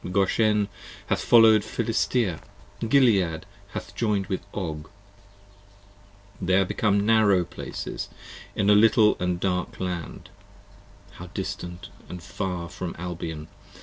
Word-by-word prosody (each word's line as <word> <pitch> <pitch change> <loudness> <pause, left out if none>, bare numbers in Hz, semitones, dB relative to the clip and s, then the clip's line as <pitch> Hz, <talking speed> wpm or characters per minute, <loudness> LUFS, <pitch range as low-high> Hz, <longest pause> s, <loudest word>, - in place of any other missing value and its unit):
Goshen 105 +2 +2 0.4
hath - - 0
follow'd 110 -3 +6
Philistea: 115 -5 0 0.5
Gilead 100 - +3 0.3
hath - - -6
join'd 105 -4 0
with 95 - -3
Og: 80 -5 -5 1.5
They 95 0 +2
are 95 0 +4
become 100 +1 +1
narrow 105 -4 +4
places - - -6 0.5
in 100 +1 +3
a - - +8
little 105 0 +5
and 90 -1 -1
dark 90 -1 -2
land: 90 -3 -5 0.8
15 - - -18
How - - -8
distant 90 0 -5 0.3
far 90 +1 -4
from 90 0 -6
Albion! 80 -3 -5
95 Hz, 115 wpm, -25 LUFS, 90-105 Hz, 1.5 s, a